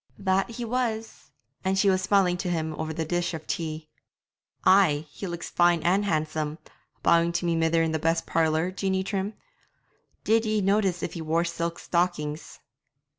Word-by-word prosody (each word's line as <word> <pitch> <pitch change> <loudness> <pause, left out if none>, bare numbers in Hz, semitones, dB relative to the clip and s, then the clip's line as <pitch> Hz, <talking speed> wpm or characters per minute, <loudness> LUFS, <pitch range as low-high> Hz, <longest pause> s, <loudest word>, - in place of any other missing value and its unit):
'That 190 0 +1
he 235 +1 -5
was; 225 -2 -3 0.3
and 190 0 +1
she 195 -1 +4
smiling 185 -1 +2
tae 180 +1 -3
him 160 -2 -1
over 160 - -2
the 160 0 -3
dish 175 +1 -1
of 160 - -8
tea.' 155 -1 -4 0.8
'Ay, 165 -6 +5
he 195 - -6
looks 170 -1 -6
fine 175 -1 +4
and 190 +5 +2
handsome, 155 -3 -1 0.5
bowing 170 0 +4
to 175 +1 -2
my 170 - +1
mither 165 0 +2
in 160 - 0
the 160 - -1
best 165 +1 0
parlour, 160 +2 +1
Jeanie 190 0 -1
Trim. 200 +1 -3 0.9
Did 225 +1 +3
ye 215 -1 +1
notice 195 -2 +1
if - - -3
he 170 - -5
wore 165 +2 +1
silk 170 0 -3
stockings?' 170 -4 -2
175 Hz, 170 wpm, -26 LUFS, 160-195 Hz, 0.9 s, Ay